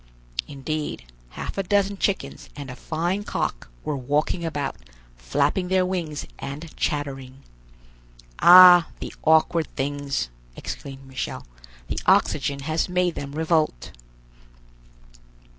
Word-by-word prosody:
Indeed, 150 - -4 0.3
half - - -5
a - - +3
dozen 200 +1 +1
chickens 195 0 -2
and 140 -3 -7
a - - -8
fine 175 +8 -2
cock - - -3
were 150 - -2
walking 145 +6 -1
about, 145 -4 -3 0.4
flapping 140 - 0
their 185 0 +2
wings 170 -5 -3
and 150 +4 -7
chattering. 135 -3 -3 1.0
"Ah, 180 -1 +9
the - - -6
awkward 160 +1 +3
things!" 140 - -2 0.3
exclaimed 135 -1 -7
Michel. 130 - -5 0.4
"The - - -2
oxygen 140 -1 +2
has 155 +5 -1
made 180 -1 +1
them 140 -2 -6
revolt." 155 - 0
155 Hz, 110 wpm, -24 LUFS, 140-175 Hz, 1.0 s, Ah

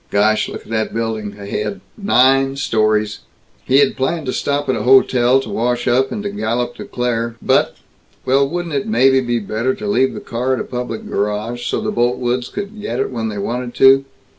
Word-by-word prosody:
Gosh, 105 +1 +2
look - - -7
at - - -18
that 110 0 -1
building 110 -3 -3
ahead 100 0 -4 0.2
nine 135 - +3
stories!" 110 -5 0 0.5
He 130 - +3
had 140 -1 +4
planned 155 +4 -1
to 130 - -2
stop 145 0 -1
at 130 - +1
a - - -2
hotel, 130 +1 +4
to - - -8
wash 120 +2 -1
up, 130 +2 +2
and 210 -2 -4
to 205 - -3
gallop 120 - -2
to - - -7
Claire. 115 -1 -2
But - - +2 0.5
well 135 +1 +3
wouldn't 175 0 -4
it 140 -1 -1
maybe 130 +4 +4
be 120 -1 -1
better 115 +4 -1
to 105 - -7
leave 125 +6 +1
the - - -5
car 125 +3 -1
at - - -5
a - - -2
public 125 -3 -5
garage, 105 +4 -2
so - - -1
the - - -2
Boltwoods 120 +1 0
could 205 +1 -6
get 125 - -3
it 135 - -1
when 115 -3 -3
they 105 - -5
wanted 120 +4 -3
to? 135 +1 +6
125 Hz, 205 wpm, -18 LUFS, 110-135 Hz, 0.5 s, to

